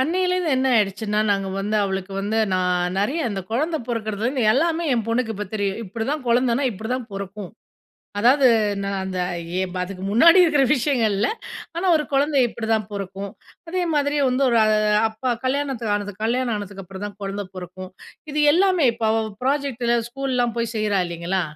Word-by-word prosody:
அன்னையிலேருந்து 360 +3 +1
என்ன 265 +1 +1
ஆயிடுச்சுன்னா, 210 0 +1
நாங்க 195 -1 0
வந்து 210 +2 -1
அவளுக்கு 190 0 -3
வந்து 210 +3 -1
நான் 180 0 0
நிறைய, 270 +12 0
அந்த 195 -2 -3
குழந்தை 310 +7 0
பிறக்கிறதுலிருந்து 230 +3 -2
எல்லாமே 330 +4 +1
என் 230 - 0
பொண்ணுக்கு 230 0 0
இப்ப 210 +1 -4
தெரியும். 200 +1 -1
இப்பிடிதான், 230 +9 -3
குழந்தனா 245 +2 +2
இப்பிடிதான் 230 +4 -4
பொறக்கும். 195 0 -6 0.7
அதாவது 260 +5 +5 0.4
நான் 200 0 -2
அந்த 190 -1 -4 0.4
ஏ - - +1
ப - - -5
அதுக்கு 190 0 -6
முன்னாடி 335 - +7
இருக்கிற 295 -5 +3
விஷயங்கள் 245 -6 +1
இல்ல. 210 - +1 0.5
ஆனா, 370 +2 -1
ஒரு 300 - -1
குழந்தை 280 0 +2
இப்பிடிதான் 220 -3 -1
பொறக்கும். 195 0 -5 0.4
அதே 365 0 0
மாதிரி 290 0 +1
வந்து 255 +2 0
ஒரு 235 - +3 0.5
அப்பா 240 +3 -2
கல்யாணத்துக்கு 255 -5 -1
ஆனது 205 -1 -5
கல்யாணம் 240 0 0
ஆனதுக்கு 200 -1 -7
அப்புறம் 195 +2 -8
தான் 205 0 -10
குழந்தை 195 0 -4
பொறக்கும். 185 +1 -8 0.4
இது 300 - 0
எல்லாமே 370 -5 +3
இப்ப 230 - -4
அவ 225 - +2 0.2
ப்ராஜெக்ட்டில 255 -4 +1
ஸ்கூல்லாம் 250 -2 -1
போய் 230 0 -2
செய்றா 210 -2 +1
இல்லைங்களா! 170 +2 -2
225 Hz, 160 wpm, -22 LUFS, 200-270 Hz, 0.7 s, முன்னாடி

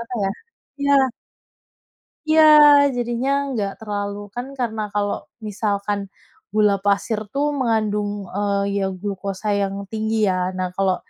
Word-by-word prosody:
apa 235 +1 -7
ya 195 - 0 0.6
ya. 265 -2 +4 1.2
Iya, 315 0 +6 0.5
jadinya 240 +2 -1 0.2
nggak 200 -5 -2
terlalu, 205 -1 -3 0.2
kan 245 +2 -4
karena 220 -3 -2
kalau 205 0 0 0.3
misalkan 205 -1 -2 0.5
gula 210 -2 +4
pasir 205 +2 +1
tuh 280 +1 0
mengandung, 215 -4 0 0.2
eee, 200 0 0
ya - - 0 0.2
glukosa 200 0 -4
yang 195 0 -1 0.2
tinggi 220 0 -1
ya. 185 -1 0
Nah 185 -1 -3
kalau 190 -2 +2
205 Hz, 125 wpm, -21 LUFS, 200-225 Hz, 1.2 s, Iya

